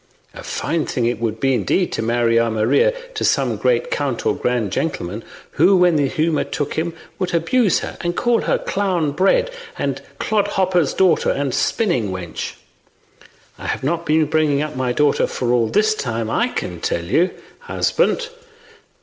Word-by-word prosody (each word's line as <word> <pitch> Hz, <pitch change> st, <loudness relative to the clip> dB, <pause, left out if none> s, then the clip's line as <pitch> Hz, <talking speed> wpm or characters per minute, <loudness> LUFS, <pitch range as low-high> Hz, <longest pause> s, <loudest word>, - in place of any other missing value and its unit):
A -, -, -9 dB
fine 165 Hz, -2 st, -2 dB
thing 120 Hz, -, -1 dB
it 120 Hz, -2 st, 0 dB
would 115 Hz, -1 st, -2 dB
be, 135 Hz, +1 st, +2 dB
indeed, 125 Hz, -, +1 dB
to -, -, -2 dB
marry 115 Hz, 0 st, +2 dB
our 115 Hz, 0 st, +2 dB
Maria 110 Hz, -, +3 dB, 0.2 s
to -, -, -3 dB
some -, -, +2 dB
great -, -, 0 dB
count 485 Hz, -, -2 dB
or 435 Hz, -, +2 dB
grand 120 Hz, -5 st, -1 dB
gentleman, 105 Hz, -, -3 dB, 0.3 s
who, 185 Hz, +5 st, +4 dB
when 180 Hz, -2 st, +4 dB
the 145 Hz, -2 st, +2 dB
humour 155 Hz, +2 st, 0 dB
took 145 Hz, -1 st, -3 dB
him, 165 Hz, +1 st, -2 dB, 0.2 s
would 180 Hz, -2 st, -1 dB
abuse 190 Hz, +5 st, +2 dB
her -, -, -6 dB
and 175 Hz, 0 st, -2 dB
call 240 Hz, -1 st, +2 dB
her -, -, +1 dB
clown 185 Hz, -7 st, -1 dB
bred 195 Hz, -, +2 dB, 0.3 s
and -, -, -2 dB, 0.2 s
clodhopper's 190 Hz, -6 st, +1 dB
daughter 185 Hz, -4 st, +3 dB
and 140 Hz, -2 st, -1 dB
spinning 170 Hz, -, 0 dB
wench. 90 Hz, -3 st, -5 dB, 1.1 s
I -, -, -6 dB
have -, -, -2 dB
not 170 Hz, +4 st, -1 dB
been 155 Hz, +1 st, +3 dB
bringing 150 Hz, -1 st, +1 dB
up 155 Hz, -2 st, -5 dB
my 130 Hz, -1 st, -1 dB
daughter 145 Hz, +3 st, +2 dB
for 125 Hz, -, -4 dB
that -, -, +3 dB
all 120 Hz, -2 st, +3 dB
this 215 Hz, -, +2 dB
time, 115 Hz, -, -3 dB
I -, -, +2 dB
can -, -, -5 dB
tell 85 Hz, -, -1 dB
you, 170 Hz, -, +2 dB, 0.3 s
husband. -, -, 0 dB
155 Hz, 175 wpm, -20 LUFS, 120-185 Hz, 1.1 s, who